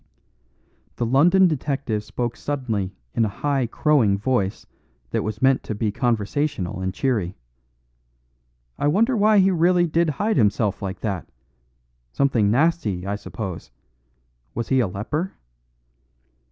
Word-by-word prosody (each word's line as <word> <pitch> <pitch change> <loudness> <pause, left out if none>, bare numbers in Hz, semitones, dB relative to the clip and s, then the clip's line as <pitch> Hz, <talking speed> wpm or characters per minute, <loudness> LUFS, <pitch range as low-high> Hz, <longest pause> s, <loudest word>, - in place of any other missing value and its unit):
The 120 - -1
London 175 +10 +5
detective 135 -8 -2
spoke 120 +2 -3
suddenly 110 -10 -3 0.2
in 115 - +2
a - - +2
high 135 +4 -1
crowing 120 -6 +2
voice 100 -3 -1 0.5
that - - 0
was 110 +2 -4
meant 135 0 +4
to 110 - -5
be 105 0 -1
conversational 110 -3 -1
and 95 0 -1
cheery. 100 -5 -1 1.4
"I - - +1
wonder 225 - +3
why 215 0 +4
he 195 0 +5
really 175 0 +3
did 170 0 +1
hide 210 +9 0
himself 105 -2 +1
like 95 -2 -5
that. 100 -7 -3 0.8
Something 120 - +2
nasty, 115 - +1
I 100 +1 -2
suppose; 100 - -6 0.9
was 115 - -3
he 130 - +3
a 120 - +2
leper?" 145 - -3
120 Hz, 130 wpm, -23 LUFS, 105-150 Hz, 1.4 s, London